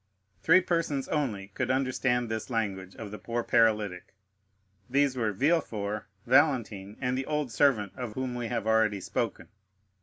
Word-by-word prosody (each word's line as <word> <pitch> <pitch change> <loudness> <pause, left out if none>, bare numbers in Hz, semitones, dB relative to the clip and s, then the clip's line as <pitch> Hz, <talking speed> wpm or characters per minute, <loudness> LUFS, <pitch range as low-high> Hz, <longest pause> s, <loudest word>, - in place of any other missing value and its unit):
Three 185 +3 +6
persons 165 -6 -1
only 110 -10 -2
could 100 - -3
understand 130 -2 +1
this 110 +1 -4
language 95 -5 -3
of 105 -3 -8
the 105 - -7
poor 120 0 -3
paralytic; 105 -6 +1 0.7
these 140 0 +2
were 115 -4 0
Villefort, 105 - 0 0.2
Valentine, 120 -7 +2
and 125 0 -1
the 130 +1 -3
old 150 -4 -1
servant 115 -6 +2
of 125 -4 -5
whom 130 +1 -3
we 120 -1 -3
have 110 - -2
already 110 -2 +2
spoken. - - -3
120 Hz, 150 wpm, -29 LUFS, 105-135 Hz, 0.7 s, Three